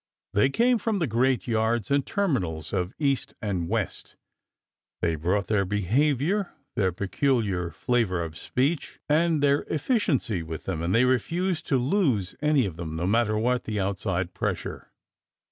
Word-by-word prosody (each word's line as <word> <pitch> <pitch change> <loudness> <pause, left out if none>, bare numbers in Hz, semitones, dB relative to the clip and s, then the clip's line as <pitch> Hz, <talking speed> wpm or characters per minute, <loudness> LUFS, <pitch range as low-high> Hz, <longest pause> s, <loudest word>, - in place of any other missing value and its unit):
They 105 +6 +4
came 240 - +3
from 220 0 0
the 170 - +1
great 125 -3 +1
yards 115 +1 0
and 140 0 +3
terminals 95 - -1
of 90 +1 -1
East 140 -3 0
and 95 -5 -2
West, - - -3 0.8
they 85 - +1
brought 90 +6 0
their 105 -2 +2
behavior, 140 - +1 0.2
their 95 -3 +2
peculiar 100 -2 0
flavor 95 -1 0
of 80 -1 -7
speech, 140 - -1
and 155 0 +2
their 140 0 +4
efficiency 145 - 0
with 80 -1 -6
them, 80 - -3
and 85 +5 0
they 120 +2 +5
refused 165 - 0
to 135 - +3
lose 125 - +1
any 150 -4 +3
of 85 -5 -5
them, 80 -2 -5
no 85 +2 -2
matter 110 +2 +2
what 125 +3 +1
the 105 -2 -2
outside 95 -2 -1
pressure. - - -3
115 Hz, 155 wpm, -26 LUFS, 95-145 Hz, 0.8 s, they